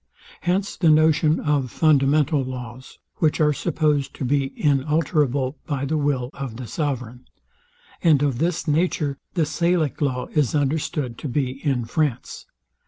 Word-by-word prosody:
Hence 190 Hz, +3 st, -1 dB
the 170 Hz, -, +3 dB
notion 155 Hz, 0 st, +4 dB
of 145 Hz, -4 st, 0 dB
fundamental 145 Hz, +2 st, +3 dB
laws; 125 Hz, -1 st, -8 dB, 0.2 s
which 155 Hz, -3 st, +1 dB
are 150 Hz, -1 st, +3 dB
supposed 150 Hz, -3 st, 0 dB
to 135 Hz, -, -4 dB
be 135 Hz, +1 st, 0 dB
inalterable 145 Hz, -2 st, +1 dB
by 140 Hz, -3 st, -2 dB
the 155 Hz, +3 st, -1 dB
will 140 Hz, -4 st, 0 dB
of 135 Hz, -5 st, -6 dB
the 125 Hz, -, -6 dB
sovereign: 125 Hz, -3 st, -4 dB, 0.8 s
And 155 Hz, -5 st, +4 dB
of 135 Hz, -4 st, 0 dB
this 170 Hz, 0 st, -1 dB
nature 150 Hz, -3 st, 0 dB, 0.2 s
the 165 Hz, -3 st, +2 dB
Salic 170 Hz, -2 st, 0 dB
law 130 Hz, -3 st, 0 dB
is 150 Hz, -2 st, +1 dB
understood 145 Hz, -3 st, -1 dB
to -, -, -5 dB
be 135 Hz, +1 st, -2 dB
in 135 Hz, -6 st, 0 dB
France. 140 Hz, +1 st, -2 dB
145 Hz, 145 wpm, -23 LUFS, 130-155 Hz, 0.8 s, notion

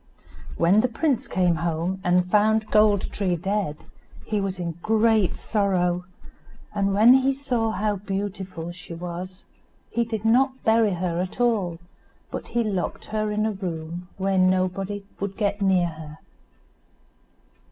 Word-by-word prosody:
When 175 Hz, +5 st, +4 dB
the 250 Hz, -, +2 dB
prince 260 Hz, +2 st, 0 dB
came 180 Hz, -2 st, +1 dB
home, 170 Hz, +3 st, -2 dB
and 180 Hz, 0 st, +3 dB
found 215 Hz, +3 st, +2 dB
Gold 210 Hz, -2 st, +3 dB
tree 185 Hz, -3 st, 0 dB
dead, 190 Hz, -3 st, -2 dB, 0.5 s
he 210 Hz, -2 st, -1 dB
was 195 Hz, -1 st, -2 dB
in 170 Hz, -2 st, -5 dB
great 220 Hz, -2 st, +2 dB
sorrow, 180 Hz, -4 st, 0 dB, 0.7 s
and 200 Hz, -1 st, +1 dB
when 225 Hz, +5 st, +7 dB
he 265 Hz, +1 st, +4 dB
saw 250 Hz, -5 st, -1 dB
how 210 Hz, 0 st, -1 dB
beautiful 195 Hz, -3 st, -4 dB
she 175 Hz, -1 st, -9 dB
was, 180 Hz, +2 st, -7 dB, 0.5 s
he 235 Hz, -, +1 dB
did 220 Hz, -2 st, -4 dB
not 260 Hz, +3 st, +3 dB
bury 220 Hz, -3 st, +3 dB
her 175 Hz, -1 st, -1 dB
at 185 Hz, +5 st, -5 dB
all, 210 Hz, -8 st, +1 dB, 0.5 s
but -, -, -5 dB
he 240 Hz, 0 st, 0 dB
locked 195 Hz, -5 st, -3 dB
her 215 Hz, 0 st, 0 dB
in 210 Hz, +1 st, 0 dB
a 220 Hz, -, +1 dB
room 175 Hz, -3 st, -5 dB
where 195 Hz, 0 st, +1 dB
nobody 185 Hz, +2 st, +1 dB, 0.2 s
would 195 Hz, -1 st, -4 dB
get 205 Hz, -1 st, -1 dB
near 190 Hz, -2 st, +3 dB
her. 155 Hz, -1 st, -10 dB
195 Hz, 145 wpm, -24 LUFS, 180-215 Hz, 0.7 s, when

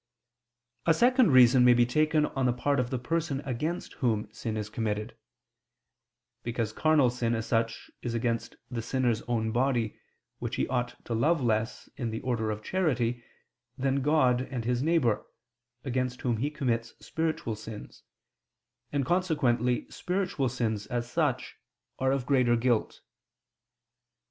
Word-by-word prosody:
A 165 Hz, -, +5 dB
second 255 Hz, -2 st, +5 dB
reason 125 Hz, 0 st, +7 dB
may 125 Hz, 0 st, +7 dB
be 120 Hz, 0 st, +5 dB
taken 155 Hz, +4 st, +2 dB
on 135 Hz, -3 st, -1 dB
the 120 Hz, -, +2 dB
part 140 Hz, +3 st, 0 dB
of 125 Hz, -1 st, 0 dB
the 130 Hz, -, -1 dB
person 155 Hz, +2 st, -1 dB
against 150 Hz, +7 st, -3 dB
whom 110 Hz, -4 st, 0 dB
sin 110 Hz, 0 st, -4 dB
is 105 Hz, -1 st, -3 dB
committed: 110 Hz, -1 st, -3 dB, 1.3 s
because 115 Hz, -2 st, -2 dB
carnal 150 Hz, -2 st, +3 dB
sin, 120 Hz, -1 st, 0 dB
as 115 Hz, 0 st, -3 dB
such, 115 Hz, -1 st, -1 dB
is 120 Hz, -1 st, -3 dB
against 115 Hz, 0 st, -1 dB, 0.2 s
the 120 Hz, -2 st, -2 dB
sinner's 120 Hz, -1 st, 0 dB
own 110 Hz, -2 st, 0 dB
body, 120 Hz, -2 st, 0 dB, 0.4 s
which -, -, -3 dB
he -, -, 0 dB
ought 125 Hz, -1 st, -1 dB
to 120 Hz, -, -3 dB
love 150 Hz, +9 st, +2 dB
less, 110 Hz, 0 st, -1 dB
in 120 Hz, -3 st, -2 dB
the 110 Hz, 0 st, -3 dB
order 115 Hz, -4 st, -1 dB
of 105 Hz, 0 st, -4 dB
charity, 125 Hz, -10 st, 0 dB, 0.5 s
than 135 Hz, +1 st, +1 dB
God 130 Hz, -4 st, +3 dB
and 125 Hz, -4 st, -4 dB
his 125 Hz, +1 st, 0 dB
neighbor, 145 Hz, -8 st, +2 dB, 0.6 s
against 125 Hz, -1 st, -2 dB
whom 120 Hz, -3 st, 0 dB
he 140 Hz, +7 st, 0 dB
commits 120 Hz, -6 st, -2 dB
spiritual 160 Hz, -8 st, -2 dB
sins, 110 Hz, 0 st, -9 dB, 0.9 s
and 140 Hz, -2 st, 0 dB
consequently 130 Hz, -9 st, +1 dB
spiritual 180 Hz, -8 st, -1 dB
sins, 110 Hz, -4 st, -2 dB
as 120 Hz, -2 st, -2 dB
such, -, -, -1 dB, 0.4 s
are 130 Hz, 0 st, +2 dB
of 135 Hz, -2 st, -1 dB
greater 125 Hz, -3 st, +3 dB
guilt. 120 Hz, -1 st, 0 dB
125 Hz, 150 wpm, -29 LUFS, 115-140 Hz, 1.3 s, reason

